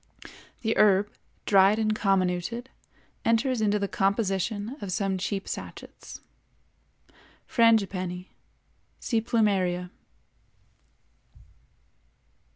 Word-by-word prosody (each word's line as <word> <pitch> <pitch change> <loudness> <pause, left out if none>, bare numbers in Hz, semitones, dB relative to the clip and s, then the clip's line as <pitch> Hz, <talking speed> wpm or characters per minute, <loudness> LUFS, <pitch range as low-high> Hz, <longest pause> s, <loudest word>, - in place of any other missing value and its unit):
The 225 0 +1
herb, 205 -1 +4 0.3
dried 195 +1 +5
and 215 -1 +1
comminuted, 195 +5 0 0.5
enters 230 +1 +1
into 210 -1 +2
the 200 -1 -1
composition 200 +3 -1
of 195 - -5
some 190 0 -1
cheap 195 +1 -3
sachets. - - -8 1.2
FRANGIPANNI 195 -6 +1 0.7
(see 230 -3 0
Plumeria). 190 -6 0
200 Hz, 75 wpm, -27 LUFS, 190-225 Hz, 1.2 s, dried